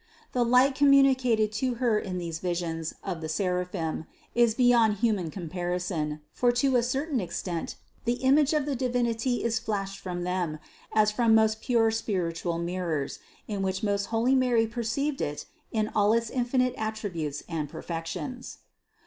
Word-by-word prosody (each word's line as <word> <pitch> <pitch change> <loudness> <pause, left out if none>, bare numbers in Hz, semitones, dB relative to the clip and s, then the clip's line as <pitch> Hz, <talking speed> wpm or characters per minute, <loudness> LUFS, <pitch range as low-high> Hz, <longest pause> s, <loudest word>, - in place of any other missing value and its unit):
The 245 - +2
light 250 +3 +5
communicated 265 -6 +4
to 255 -2 0
Her 235 -3 +2
in 185 -3 -4
these 165 -2 -4
visions 170 -2 -3
of 180 -4 -4
the 160 - -4
seraphim 180 -2 -2 0.3
is 235 -2 +3
beyond 240 -4 +4
human 210 -6 0
compar 175 +1 -3
ison; 155 -4 -3
for 245 +7 +2
to 260 +2 +2
a 245 - +5
certain 270 +3 -1
extent 175 -2 -4 0.3
the 235 - +2
image 270 +3 +3
of 300 -3 +1
the 285 -2 -1
Divinity 245 -1 0
is 230 -1 +1
flashed 195 -2 -3
from 175 -1 -4
them, 180 -3 -1 0.3
as 210 -1 +3
from 225 0 +3
most 220 0 +3
pure 230 -3 +3
spiritual 175 -6 -2
mirrors, 170 -4 -2 0.3
in 205 -2 -3
which 190 +1 -2
most 200 -1 +1
holy 230 +3 +1
Mary 250 -3 +3
perceived 240 +5 -2
it 145 0 -3 0.3
in 215 -1 0
all 210 +1 +4
its 230 -1 0
infinite 250 0 +1
at 220 0 -2
tributes 165 -9 -4
and 155 -4 -3
perfections. 170 - -6
215 Hz, 160 wpm, -27 LUFS, 180-245 Hz, 0.3 s, light